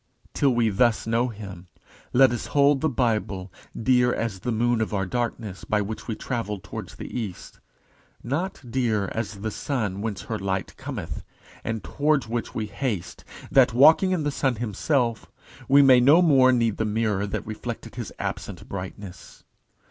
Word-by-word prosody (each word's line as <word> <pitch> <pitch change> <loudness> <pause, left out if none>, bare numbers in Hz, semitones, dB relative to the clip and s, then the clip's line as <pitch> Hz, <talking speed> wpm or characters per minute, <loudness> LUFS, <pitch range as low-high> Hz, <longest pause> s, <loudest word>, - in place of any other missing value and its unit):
Till 140 - +3
we 115 -2 +3
thus 115 +3 +2
know 115 +2 +1
Him, 100 -6 -9 0.4
let 130 0 +6
us 120 - -3
hold 140 -1 +3
the 160 - +2
Bible 105 -7 -1 0.3
dear 125 +1 +3
as 115 -6 -2
the 125 - -3
moon 120 +1 +1
of 110 -1 -1
our 95 -1 0
darkness, 115 -2 -3
by 105 - 0
which 105 +2 -5
we 115 - -2
travel 115 -5 -3
towards 95 - -8
the - - -8
east; 110 -7 -6 0.6
not 160 +10 -2
dear 115 -5 0
as 110 -3 -4
the 110 +1 -2
sun 105 -7 -2
whence 105 -3 -4
her 110 -2 -4
light 95 -1 -3
cometh, 110 - -6 0.4
and 110 -1 -3
towards 145 -4 +1
which 115 +1 -4
we 110 - -1
haste, 105 -4 -4 0.3
that, 125 -3 +5
walking 160 +8 +6
in 180 -4 0
the 145 - 0
sun 135 -2 0
himself, 120 +2 -1 0.4
we 140 +1 +7
may 130 -2 +7
no 145 +8 +6
more 135 -6 +6
need 115 -4 +1
the - - 0
mirror 105 -2 0
that 100 - -4
reflected 115 +1 -6
his 120 -6 -6
absent - - -5
brightness. 95 0 -8
115 Hz, 170 wpm, -25 LUFS, 105-130 Hz, 0.6 s, we